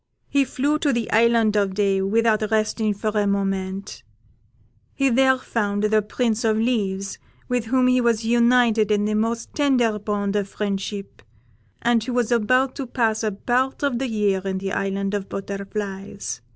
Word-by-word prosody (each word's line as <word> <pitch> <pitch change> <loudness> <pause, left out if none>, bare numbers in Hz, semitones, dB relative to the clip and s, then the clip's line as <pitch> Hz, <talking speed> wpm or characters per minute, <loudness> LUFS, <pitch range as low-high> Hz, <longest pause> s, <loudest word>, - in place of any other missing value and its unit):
He 280 -1 +2
flew 290 +4 0
to 290 - +1
the 235 -3 -2
Island 230 -1 +3
of 200 -2 +1
Day 195 -1 +1
without 215 +1 +1
resting 215 0 0
for 215 +2 -2
a 210 -1 +1
moment; 195 -1 -2 0.9
he 275 -1 +2
there 260 +1 +4
found 205 -5 -2
the 215 0 +3
Prince 225 +1 -1
of 220 -1 +2
Leaves, 200 -4 -1 0.3
with 245 -2 -1
whom 255 +2 +2
he 255 0 +3
was 230 -2 +1
united 235 -2 +3
in 205 0 +2
the 215 - 0
most 225 +2 -2
tender 250 -7 +2
bond 205 -1 -2
of 200 -1 -1
friendship, 200 0 -4 0.6
and 235 -1 +2
who 250 - -4
was 245 -1 0
about 255 +3 +2
to 270 - -4
pass 225 -3 0
a 215 - 0
part 255 +7 -1
of 270 -4 0
the 265 - -1
year 205 -3 +1
in 190 -1 -2
the 195 0 -4
Island 195 +1 -2
of 200 -1 -3
Butterflies. 195 - -5
215 Hz, 170 wpm, -22 LUFS, 200-240 Hz, 0.9 s, there